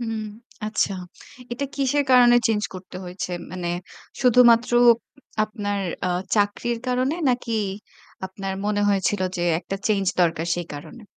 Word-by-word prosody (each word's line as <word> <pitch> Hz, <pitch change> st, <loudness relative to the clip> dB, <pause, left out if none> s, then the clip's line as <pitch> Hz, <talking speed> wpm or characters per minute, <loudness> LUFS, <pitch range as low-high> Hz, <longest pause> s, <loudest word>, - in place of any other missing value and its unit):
হুম, 225 Hz, -2 st, -3 dB, 0.4 s
আচ্ছা। 215 Hz, -2 st, 0 dB, 0.6 s
এটা 245 Hz, +4 st, -2 dB
কিসের 280 Hz, +1 st, +1 dB
কারণে 245 Hz, -1 st, +7 dB
চেঞ্জ 215 Hz, -2 st, +1 dB
করতে 185 Hz, 0 st, -9 dB
হয়েছে? 180 Hz, 0 st, -5 dB, 0.2 s
মানে 180 Hz, -1 st, -4 dB, 0.5 s
শুধুমাত্র 245 Hz, -2 st, +5 dB, 0.7 s
আপনার 205 Hz, -2 st, -3 dB, 0.3 s
আ -, -, +1 dB, 0.3 s
চাকরির 215 Hz, +3 st, 0 dB
কারণে? 255 Hz, +4 st, +1 dB
নাকি 245 Hz, -2 st, -1 dB, 0.7 s
আপনার 195 Hz, +1 st, -5 dB
মনে 210 Hz, 0 st, 0 dB
হয়েছিল 200 Hz, 0 st, +1 dB, 0.2 s
যে 175 Hz, -, -2 dB, 0.2 s
একটা 195 Hz, -, -5 dB
চেঞ্জ 205 Hz, -3 st, +1 dB, 0.2 s
দরকার 165 Hz, -1 st, +1 dB
সেই 175 Hz, -1 st, -4 dB
কারণে? 220 Hz, +11 st, -10 dB
215 Hz, 130 wpm, -23 LUFS, 190-245 Hz, 0.7 s, কারণে